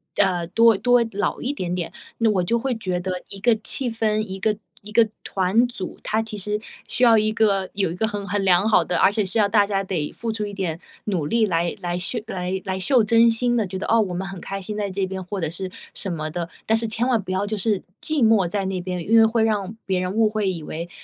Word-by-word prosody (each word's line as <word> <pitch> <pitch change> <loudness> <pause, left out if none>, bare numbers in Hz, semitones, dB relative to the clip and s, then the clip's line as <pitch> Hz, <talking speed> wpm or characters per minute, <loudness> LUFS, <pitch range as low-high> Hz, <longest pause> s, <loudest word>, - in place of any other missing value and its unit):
呃， 180 -4 +2
多 230 +4 +5
多 245 +1 +3
老 200 -2 -1
一 270 - -1
点 180 -9 -3
点， 175 -2 -3 0.3
那 230 -1 +3
我 190 -3 +1
就 230 +7 +1
会 255 +2 -1
觉 185 -5 -2
得 185 +1 -3 0.2
一 195 - -9
个 235 +3 +4
气 240 +4 -1
氛， 220 -1 0
一 195 -3 -6
个 210 +1 0 0.2
一 210 - -11
个 225 +1 +5 0.2
团 195 +5 +2
组， 195 -7 -3
它 220 +1 0
其 220 -1 -6
实 210 +1 -2 0.3
需 250 - 0
要 230 -2 +6
一 215 0 +2
个 205 -4 +1
有 195 -3 0
一 - - -5
个 220 - 0
很 205 -2 -5
很 200 +1 -1
良 185 +1 +4
好 220 - +4
的 180 - -1
而 - - +5
且 215 -1 +1
是 190 +3 -2
要 210 -2 +4
大 205 0 +4
家 195 -1 -1
得 175 -6 -2
付 230 -1 -4
出 215 -1 -2
一 205 - -6
点 180 -5 -3 0.3
努 180 -8 -1
力 230 +5 +2
来 170 -3 0
来 175 -1 -2
秀 210 +7 0
来 185 -2 -3
来 190 -1 -2
秀 250 +6 +4
真 230 +2 +5
心 240 +2 +2
的， 225 -3 +1
觉 190 +1 -5
得， - - -4
哦， 230 0 +4
我 190 -4 -2
们 190 +2 -3
很 190 -3 -8
开 195 0 -5
心 210 +3 -5
在 205 -1 -2
这 195 0 -1
边 190 0 -5
或 195 +2 -5
者 160 -4 -1
是 185 +3 -6 0.2
什 195 - -4
么 155 -2 -3
的。 170 +1 -4 0.2
但 225 - +3
是 225 0 0
千 230 +3 0
万 240 -4 +2
不 185 - -6
要 190 +2 0
就 215 +1 -2
是 205 0 0 0.2
寂 305 -6 +1
寞 205 -6 +3
在 195 +1 -1
那 190 -1 -2
边， 180 0 -4
因 230 - +6
为 225 - +8
会 225 0 +2
让 210 -2 -1
别 190 -1 0
人 185 0 -2
误 220 +1 +3
会， 210 -2 0
以 170 -4 -6
为， 170 +3 -6
200 Hz, 285 characters per minute, -23 LUFS, 185-225 Hz, 0.3 s, 为